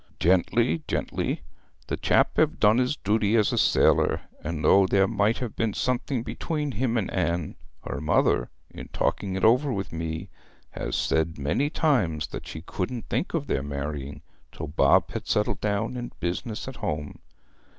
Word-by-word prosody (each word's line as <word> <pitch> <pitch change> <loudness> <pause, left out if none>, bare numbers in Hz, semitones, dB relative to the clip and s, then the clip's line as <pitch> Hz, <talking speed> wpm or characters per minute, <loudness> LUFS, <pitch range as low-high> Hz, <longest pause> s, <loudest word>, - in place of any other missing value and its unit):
'Gently, 115 - +2
gently. - - -2 0.4
The - - -2
chap - - +2
hev - - +2
done 105 +3 +5
his 130 +3 +1
duty 105 +1 +1
as 110 -3 +3
a - - 0
sailor; - - +3 0.2
and 80 -1 -3
though 95 +4 +6
there 95 0 +3
might 110 0 +1
have 120 -4 -5
been 115 -3 -1
something 125 -1 -1
between 150 +2 -3
him 120 0 0
and 105 - -1
Anne, 85 -3 -1 0.3
her 70 - -5
mother, 75 -5 +2 0.2
in - - -9
talking 95 -2 -1
it 95 - -3
over 125 +6 +4
with 100 -7 -4
me, 80 +2 -4 0.4
has - - -4
said 80 0 0
many 75 - 0
times 105 - +1
that - - -7
she 80 - -7
couldn't 105 +7 -4
think 175 - -1
of 150 -3 -1
their 70 - -1
marrying 70 +1 -5 0.3
till - - -6
Bob 75 - +3
had - - -5
settled 105 - 0
down 105 +4 -1
in 120 -1 -5
business 90 +6 -3
with 130 -1 -9
me. 75 -1 -3
100 Hz, 170 wpm, -26 LUFS, 80-120 Hz, 0.4 s, though